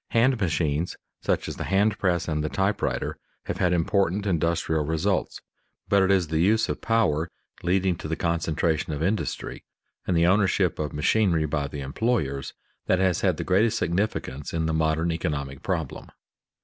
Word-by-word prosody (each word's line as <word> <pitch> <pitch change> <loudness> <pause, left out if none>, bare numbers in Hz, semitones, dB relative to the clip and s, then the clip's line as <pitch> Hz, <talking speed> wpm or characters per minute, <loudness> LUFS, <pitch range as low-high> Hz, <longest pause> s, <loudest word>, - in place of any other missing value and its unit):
Hand 120 +1 +3
machines, 80 -2 0 0.3
such - - 0
as - - -5
the - - -4
hand 100 +2 +2
press 85 -3 +1
and 75 -2 -1
the 75 - -1
type 95 +2 0
writer, - - -2 0.3
have - - -3
had 90 - +2
important 95 +3 +1
industrial 85 -3 +1
results, 80 +1 -1 0.5
but 100 -1 +4
it 95 - +3
is 95 -5 +3
the 80 0 0
use 110 +6 +3
of - - -3
power 90 -9 +1 0.3
leading 90 0 +1
to - - -6
the 80 - -1
concentration 80 -1 0
of 75 +2 -2
industry 100 +5 -2 0.4
and 90 - +2
the 85 - +4
ownership 95 -1 +2
of 75 -2 -2
machinery 85 +1 +2
by 75 -1 -1
the 70 0 -6
employers 70 - -1 0.3
that 95 - +3
has 95 -2 +1
the - - +1
greatest 105 +5 +2
significance 85 -7 -2
in 80 -1 0
the 80 - 0
modern 80 +1 +1
economic 70 -5 -3
problem. 80 -7 -3
85 Hz, 170 wpm, -25 LUFS, 80-95 Hz, 0.5 s, but